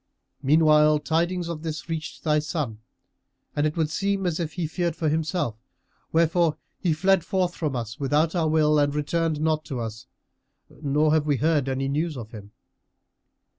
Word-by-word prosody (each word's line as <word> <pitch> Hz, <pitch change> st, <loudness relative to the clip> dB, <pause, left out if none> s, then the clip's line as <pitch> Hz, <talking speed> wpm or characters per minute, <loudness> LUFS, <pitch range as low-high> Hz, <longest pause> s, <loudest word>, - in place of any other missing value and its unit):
Meanwhile, 150 Hz, +1 st, +5 dB
tidings 170 Hz, +3 st, 0 dB
of 170 Hz, -2 st, -5 dB
this 155 Hz, -1 st, -5 dB
reached 165 Hz, 0 st, -5 dB
thy 150 Hz, -1 st, +3 dB
son, 150 Hz, -8 st, -3 dB, 0.8 s
and 145 Hz, +1 st, +2 dB
it 155 Hz, -, -4 dB
would 160 Hz, -2 st, 0 dB
seem 200 Hz, +1 st, 0 dB
as 175 Hz, -2 st, -1 dB
if 160 Hz, -3 st, -3 dB
he 175 Hz, -2 st, -2 dB
feared 170 Hz, +1 st, -2 dB
for 160 Hz, -2 st, 0 dB
himself; 155 Hz, -, -1 dB, 0.5 s
wherefore 165 Hz, -1 st, +2 dB, 0.2 s
he 175 Hz, -, +1 dB
fled 185 Hz, +3 st, +3 dB
forth 185 Hz, -1 st, 0 dB
from 150 Hz, -6 st, -2 dB
us, 120 Hz, +2 st, -5 dB
without 150 Hz, +3 st, +1 dB
our 170 Hz, -3 st, +1 dB
will, 150 Hz, -1 st, +3 dB
and 145 Hz, 0 st, +1 dB
returned 155 Hz, +1 st, 0 dB
not 155 Hz, 0 st, +1 dB
to 130 Hz, -4 st, -4 dB
us, 110 Hz, -1 st, -6 dB, 0.7 s
nor 150 Hz, +1 st, +2 dB
have 155 Hz, -1 st, +2 dB
we 145 Hz, -2 st, +2 dB
heard 150 Hz, -2 st, +1 dB
any 135 Hz, +1 st, -1 dB
news 150 Hz, +2 st, -1 dB
of 115 Hz, -2 st, -8 dB
him." 105 Hz, -2 st, -10 dB
155 Hz, 170 wpm, -25 LUFS, 145-165 Hz, 0.8 s, Meanwhile